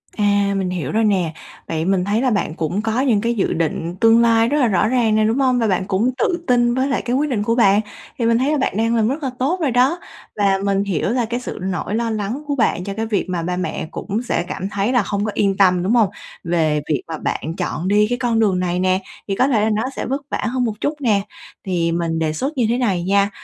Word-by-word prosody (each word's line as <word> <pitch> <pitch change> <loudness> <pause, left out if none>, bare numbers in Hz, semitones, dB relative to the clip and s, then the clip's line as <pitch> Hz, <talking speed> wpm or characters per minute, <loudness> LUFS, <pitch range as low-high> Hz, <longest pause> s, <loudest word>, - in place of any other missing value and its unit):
À, 205 -1 +2
mình 190 -2 -1
hiểu 175 -7 -3
rồi 225 +1 +1
nè. 185 -6 +1 0.3
Vậy 160 0 -2
mình 185 -1 +1
thấy 210 +3 +1
là 260 - +2
bạn 200 -7 -1
cũng 170 +5 -2
có 225 +2 -1
những 235 -7 +2
cái 235 +1 0
dự 200 - 0
định 165 +1 -2
tương 225 +2 +5
lai 230 -1 +4
rất 290 - +1
là 255 - +3
rõ 210 0 +2
ràng 230 -3 +2
nè, 215 - +3
đúng 225 +5 +1
hông? 255 -2 +2
Và 225 - +1
bạn 190 -2 0
cũng 210 +6 +1
tự 345 +6 0
tin 240 -2 +3
với 260 +1 +1
lại 275 - 0
cái 245 - -2
quyết 295 +3 +1
định 220 -6 -1
của 230 +2 +1
bạn. 205 -3 +4 0.4
Thì 235 - -1
mình 230 0 +3
thấy 265 +4 +1
là 305 - +1
bạn 265 -6 -1
đang 230 +1 +1
làm 220 -2 +2
rất 285 +6 -2
là 270 - 0
tốt 300 +9 0
rồi 290 -5 +1
đó. 260 +8 +2 0.4
Và 195 -2 +2
mình 200 0 +1
hiểu 195 -3 -1
là 240 +1 0
cái 240 +2 -3
sự 250 - -7
nỗi 190 +2 -2
lo 230 0 -1
lắng 220 +6 -3
của 285 - -1
bạn 230 -8 +1
cho 200 +1 -4
cái 220 +2 -3
việc 215 -3 -1
mà 180 -2 -1
ba 180 +1 -2
mẹ 180 -3 -3
cũng 215 +2 -3
sẽ 235 - -1
cảm 190 +1 -4
thấy 200 +3 -1
là 245 -4 +3
không 200 +1 -2
có 215 - -2
yên 195 -1 +1
tâm, 185 -3 +4
đúng 195 +5 +1
hông? 220 -5 +4 0.3
Về 160 -3 +1
việc 150 - 0
mà 165 -1 -5
bạn 160 +1 -3
chọn 175 -1 -3
đi 210 +2 +3
cái 245 - 0
con 235 -2 0
đường 200 -5 +2
này 180 0 -1
nè 185 +1 +1 0.3
thì 195 - -1
có 255 - +3
thể 235 -6 +2
là 215 - +2
nó 215 - 0
sẽ - - -3
vất 270 +3 -2
vả - - -2
hơn 250 +2 -1
một 225 - -1
chút 290 - 0
nè. 215 -6 +2 0.4
Thì 170 -3 0
mình 165 -1 -1
đề 155 -1 0
xuất 270 - -3
như 245 - +2
thế 240 - +1
này 200 -9 0
nha, 200 +2 +2
210 Hz, 275 wpm, -20 LUFS, 185-240 Hz, 0.4 s, tương